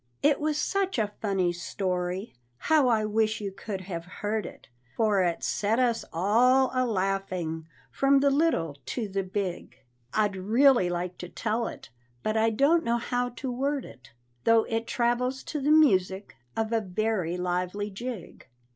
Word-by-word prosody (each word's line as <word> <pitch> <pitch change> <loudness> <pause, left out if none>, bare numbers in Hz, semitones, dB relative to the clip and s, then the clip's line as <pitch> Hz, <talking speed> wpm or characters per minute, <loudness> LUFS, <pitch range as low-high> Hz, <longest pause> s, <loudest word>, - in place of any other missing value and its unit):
It 290 -1 +4
was 305 0 0
such 385 +2 0
a 210 -2 0
funny 190 -4 +1
story! 180 +2 -3 0.2
how 305 - +3
I 220 -3 +2
wish 215 0 +1
you 200 -2 -4
could 195 0 -6
have 175 -3 -5
heard 210 +4 -3
it, - - -13 0.3
For 215 -4 +3
it 175 -2 0
set 210 +2 0
us 245 -2 +1
all 245 +9 +3
a 255 -1 +1
laughing, 185 -6 -2 0.2
from 275 0 +3
the 280 0 +3
little 220 - +1
to 230 -4 -2
the 195 0 -1
big; 190 -1 -4 0.3
I'd 210 -2 +1
really 225 +2 +4
like 175 +1 -3
to 180 - -7
tell 225 +3 -1
it, - - -9 0.3
but 215 - 0
I 220 +1 +3
don't 285 +9 +3
know 235 -2 +1
how 245 +1 -1
to 250 +1 -5
word 275 +2 -1
it, 120 -2 -14 0.3
Though 230 -1 +5
it 225 0 -3
travels 250 +2 0
to 300 - -4
the 285 - +1
music 195 - +3 0.2
of 225 0 -1
a 225 - +2
very 190 -3 -1
lively 180 +3 -2
jig. 230 -2 -7
215 Hz, 165 wpm, -27 LUFS, 185-250 Hz, 0.3 s, Though